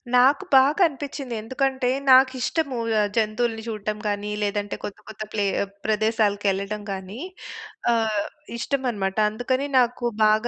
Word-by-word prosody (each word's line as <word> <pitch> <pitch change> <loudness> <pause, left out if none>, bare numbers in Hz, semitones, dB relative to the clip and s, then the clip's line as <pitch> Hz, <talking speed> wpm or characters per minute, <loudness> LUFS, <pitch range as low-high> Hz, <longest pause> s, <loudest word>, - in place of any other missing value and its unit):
నాకు 265 +3 +5
బాగా 275 +7 +5
అనిపిచ్చింది. 280 -3 -6
ఎందుకంటే 260 +2 0 0.2
నాకిష్టము. 260 +2 +4 0.2
ఆహ్, 205 -1 +2
జంతువులని 225 +1 0
జూడటం 215 -1 -3
గానీ, 205 0 -2
లేదంటే 205 0 -1
కొత్త, 200 - -5
కొత్త 215 0 -6
ప్లే 205 -2 +1 0.4
ప్రదేశాలకెళ్ళటం 210 -2 +1
గానీ. 190 +3 -6 0.7
ఆహ్, 220 -3 +1 0.3
ఇష్టమనమాట. 235 -7 -1
అందుకని 255 +5 -1
నాకు 245 0 +1 0.2
బాగా 215 +2 +3
225 Hz, 115 wpm, -24 LUFS, 210-260 Hz, 0.7 s, నాకు